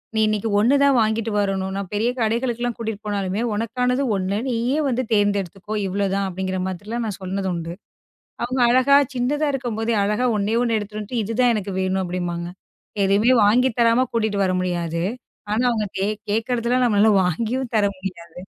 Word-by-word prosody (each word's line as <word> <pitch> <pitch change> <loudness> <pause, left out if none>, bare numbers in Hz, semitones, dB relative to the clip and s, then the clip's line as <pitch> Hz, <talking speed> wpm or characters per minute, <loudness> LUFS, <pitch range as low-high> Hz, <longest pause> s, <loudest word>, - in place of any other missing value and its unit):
நீ - - +2
இன்னைக்கு 215 +1 -1
ஒன்னு 245 +7 +4
தான் 280 -2 +4
வாங்கிட்டு 220 0 0
வரணும். 190 -1 -1
நான் 195 -3 -4
பெரிய 220 +4 +1
கடைகளுக்குக் 240 +1 -1
கூட்டிட்டு 220 -2 -4
போனாலுமே, 200 +1 -1
உனக்கானது 250 +4 0
ஒன்னு. 190 +2 -1
நீயே 245 +4 0
வந்து 255 0 0
தேர்ந்தெடுத்துக்கோ. 205 0 0
இவ்வளோ, 200 +1 -1
தான் 200 -1 0
அப்படிங்கற 185 0 -3
மாதிரி 190 +2 -6
எல்லாம் 235 0 -2
நான் 200 -2 -5
சொன்னது 190 +1 -2
உண்டு. 170 0 -4 0.7
அவங்க 250 +1 -1
அழகா 260 +3 +5 0.2
சின்னதா 290 +5 0
இருக்கும்போதே, 230 -3 -1
அழகா 210 +5 +1
ஒன்னே 205 +3 0
ஒன்னு 230 -2 +1
எடுத்திட்டு 210 +1 -6
வந்து, 235 +4 -5
இது 225 +2 -4
தான் 245 -1 +4
எனக்கு 200 -2 -3
வேணும் 190 0 0
அப்படிம்பாங்க. 175 -1 -3 0.6
எதையுமே 205 +6 +3
வாங்கி 250 +4 +4
தரமா 230 +2 +4
கூட்டிட்டு 215 -3 0
வர 185 - +1
முடியாது. 170 -2 -2 0.5
ஆனா, 235 +4 +1
அவங்க 215 -3 -1 0.4
கேக்குறது 230 +2 -1
எல்லாம் 250 0 +3
நம்மளால 210 0 +4
வாங்கிவும் 235 +8 -2
தர 205 - +3
முடியாது. 180 -3 -8
215 Hz, 170 wpm, -22 LUFS, 195-240 Hz, 0.7 s, அழகா